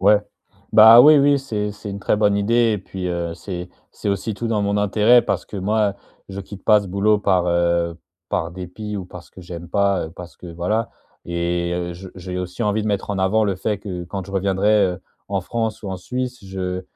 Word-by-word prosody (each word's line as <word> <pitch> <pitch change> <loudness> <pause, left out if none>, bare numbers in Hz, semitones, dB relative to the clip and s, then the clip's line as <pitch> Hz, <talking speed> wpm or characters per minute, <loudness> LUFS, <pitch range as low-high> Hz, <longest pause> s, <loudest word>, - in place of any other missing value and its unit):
Ouais, 105 +2 +5 0.5
bah 110 +2 +10
oui, 150 +4 +8
oui, 140 0 +4
c'est 105 -6 -3
c'est 105 0 -8
une 100 - -5
très 100 - +1
bonne 105 -1 +2
idée 115 +2 +2
et 105 - -1
puis, 95 -1 -6
heu, 85 -1 -3
c'est 90 -1 -7 0.2
c'est 105 - -5
aussi 100 +2 -2
tout 115 - -4
dans 105 -2 0
mon 100 0 0
intérêt, 105 +4 +4
parce - - -2
que, 105 - -9
moi, 105 +1 +1 0.3
je 100 0 -6
quitte 100 0 -11
pas 105 -1 +5
ce 100 - -8
boulot 100 +3 +2
par 95 -3 +1
heu, 85 -1 +1 0.3
par 85 - -1
dépit 95 +4 -6
ou 95 - -5
parce 90 -1 -12
que - - -13
j'aime 85 -1 -9
pas, 100 -3 +1
parce 90 +1 -11
que 90 - -11
voilà. 90 +7 -2 0.3
Et, 85 0 -2
heu, 90 0 -3
je 95 +2 -10
j'ai 90 0 -6
aussi 90 +5 -4
envie 105 0 0
de - - -4
mettre 100 -1 -1
en 100 - -2
avant 95 +4 +2
le 100 -2 -1
fait 105 +1 -2
que, 95 -4 -6
quand 95 +1 -5
je 100 - -11
reviendrai, 100 +2 +2
heu, 90 -1 -2 0.3
en 100 -1 -1
France 110 +3 -3
ou 100 - -5
en 95 - -3
Suisse, 125 +6 -4
je 95 -1 -4
100 Hz, 225 wpm, -21 LUFS, 90-105 Hz, 0.5 s, bah